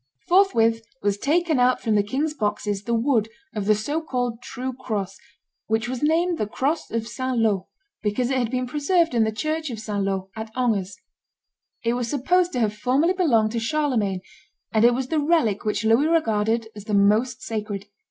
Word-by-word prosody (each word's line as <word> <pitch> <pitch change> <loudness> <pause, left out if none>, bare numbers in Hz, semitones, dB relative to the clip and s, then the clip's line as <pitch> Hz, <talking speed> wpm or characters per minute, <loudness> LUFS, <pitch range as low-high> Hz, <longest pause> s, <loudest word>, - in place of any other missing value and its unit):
Forthwith 230 - +4 0.2
was 205 0 +1
taken 320 +1 +1
out 250 +1 +3
from 220 - 0
the 205 - +4
king's 275 +9 -1
boxes 210 -5 -2
the 235 - -1
wood 230 -2 +1 0.2
of 210 -3 -3
the 215 +1 +4
so 290 +10 -2
called 245 -6 -3
true 260 +1 -5
cross, 210 -7 -4 0.5
which 220 +2 0
was 255 0 -4
named 330 +3 +2
the 210 - 0
cross 280 +9 -1
of 230 -1 -2
St. 255 +2 -3
Laud, 210 -5 +1 0.4
because 235 +5 0
it 265 - +1
had 240 -3 0
been 255 0 -1
preserved 300 +5 +1
in 230 -2 +3
the 220 - 0
church 310 +7 -2
of 235 - -5
St. 210 -2 -2
Laud, 195 -1 -2
at 220 0 -6
Angers. 205 -7 0 0.9
It 230 0 +1
was 245 -1 -2
supposed 355 +7 +2
to 250 - -1
have 215 -2 +1
formerly 265 +11 +2
belonged 235 - +2
to 235 - -1
Charlemagne; 230 -7 0 0.5
and 220 0 +3
it 240 0 +6
was 260 0 -3
the 315 - +1
relic 290 - +1
which 210 +1 -1
Louis 230 +7 +4
regarded 225 -8 +1
as 210 -1 -9
the 210 - 0
most 220 +6 +2
sacred. 210 -3 -4
235 Hz, 190 wpm, -24 LUFS, 215-280 Hz, 0.9 s, it